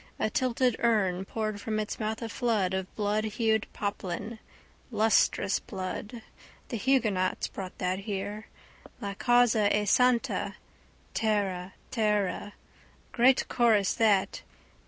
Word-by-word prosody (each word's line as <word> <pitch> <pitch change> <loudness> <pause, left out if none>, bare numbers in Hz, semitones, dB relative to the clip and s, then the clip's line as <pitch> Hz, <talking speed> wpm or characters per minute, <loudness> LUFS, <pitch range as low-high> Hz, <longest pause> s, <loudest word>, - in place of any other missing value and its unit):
A 215 - -1
tilted 250 -1 +1
urn 195 -5 +1
poured 215 -1 -3
from 215 0 -2
its 210 - -4
mouth 220 +1 -3
a 230 - -4
flood 215 -6 0
of 190 0 -2
bloodhued 215 +1 0
poplin: 205 +2 -4 0.5
lustrous 220 -3 +2
blood. 205 +5 -6 0.5
The 235 - -3
huguenots 215 -6 +1
brought 185 -2 -7
that 185 +1 -1
here. 205 +1 -5 0.5
La 200 -4 -4
causa 240 -2 +3
è 210 0 +1
santa! 250 0 +2 0.6
Tara 195 -4 -1 0.2
tara. 210 -3 0 0.6
Great 250 +2 +4
chorus 220 -5 +3
that. 205 -4 +2
215 Hz, 115 wpm, -28 LUFS, 195-230 Hz, 0.6 s, Great